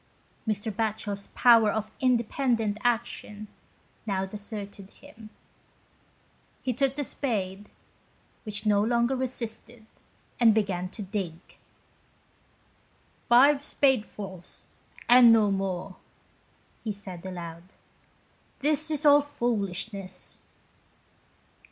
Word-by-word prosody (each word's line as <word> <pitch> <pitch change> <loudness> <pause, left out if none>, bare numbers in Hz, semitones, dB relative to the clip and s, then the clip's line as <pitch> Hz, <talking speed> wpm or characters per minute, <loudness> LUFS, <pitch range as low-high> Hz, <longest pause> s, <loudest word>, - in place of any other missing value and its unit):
Mr. 215 +1 -1
Batchel's 205 -1 -3
power 230 -3 +6
of 215 0 -3
independent 235 -3 +1
action 225 -3 -2 0.6
now 195 -2 0
deserted 205 -1 -8
him. 220 +1 -15 1.3
He 255 - 0
took 275 +2 0
the 290 - -2
spade, 205 -8 -3 0.7
which 215 -1 -4
no 205 -1 +4
longer 235 +3 +2
resisted, 240 -2 -4 0.5
and 225 -3 +6
began 185 -4 0
to 210 - -7
dig. 190 -4 -3 1.0
" - - -36
Five 275 +4 +6
spade 265 -5 +2
fuls 190 -5 -8 0.4
and 240 -1 +8
no 215 -3 +4
more," 190 -1 -3 0.9
he 220 - -2
said 190 -4 -9
aloud. 170 -3 -7 0.5
" - - -36
This 305 +2 +1
is 305 -1 -1
all 290 0 +8
foolishness." 200 -8 -2
215 Hz, 100 wpm, -27 LUFS, 200-245 Hz, 1.3 s, and